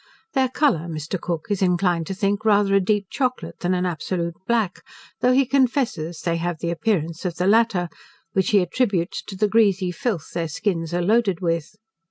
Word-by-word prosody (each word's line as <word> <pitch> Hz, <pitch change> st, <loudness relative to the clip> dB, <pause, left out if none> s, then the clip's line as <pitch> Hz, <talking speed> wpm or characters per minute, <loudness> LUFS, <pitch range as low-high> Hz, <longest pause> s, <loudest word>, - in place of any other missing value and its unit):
Their 265 Hz, -2 st, +2 dB
colour, 250 Hz, -, +1 dB
Mr. 160 Hz, +3 st, -4 dB
Cook 170 Hz, -3 st, -3 dB
is 200 Hz, -, 0 dB
inclined 175 Hz, -3 st, +1 dB
to 195 Hz, -, -4 dB
think 200 Hz, +1 st, 0 dB
rather 205 Hz, -2 st, +3 dB
a 195 Hz, -, +6 dB
deep 200 Hz, +1 st, +1 dB
chocolate, 250 Hz, -11 st, -2 dB
than 180 Hz, +1 st, 0 dB
an 180 Hz, 0 st, 0 dB
absolute 170 Hz, 0 st, -2 dB
black, 225 Hz, -6 st, 0 dB, 0.4 s
though 250 Hz, -, +3 dB
he 265 Hz, +1 st, +4 dB
confesses, 240 Hz, -, 0 dB
they 170 Hz, -1 st, 0 dB
have 175 Hz, 0 st, -2 dB
the 170 Hz, +1 st, -2 dB
appearance 170 Hz, -3 st, -1 dB
of 180 Hz, -3 st, -2 dB
the 180 Hz, -, -1 dB
latter, 210 Hz, -3 st, +3 dB, 0.5 s
which 190 Hz, -1 st, +1 dB
he 205 Hz, -2 st, +5 dB
attributes 185 Hz, -2 st, 0 dB
to 195 Hz, -, -9 dB
the 210 Hz, +3 st, +2 dB
greasy 200 Hz, -4 st, +3 dB
filth 180 Hz, -2 st, -3 dB
their 170 Hz, -1 st, -1 dB
skins 165 Hz, -1 st, -2 dB
are 175 Hz, 0 st, 0 dB
loaded 205 Hz, -2 st, +2 dB
with. 170 Hz, 0 st, -2 dB
185 Hz, 190 wpm, -23 LUFS, 170-215 Hz, 0.5 s, a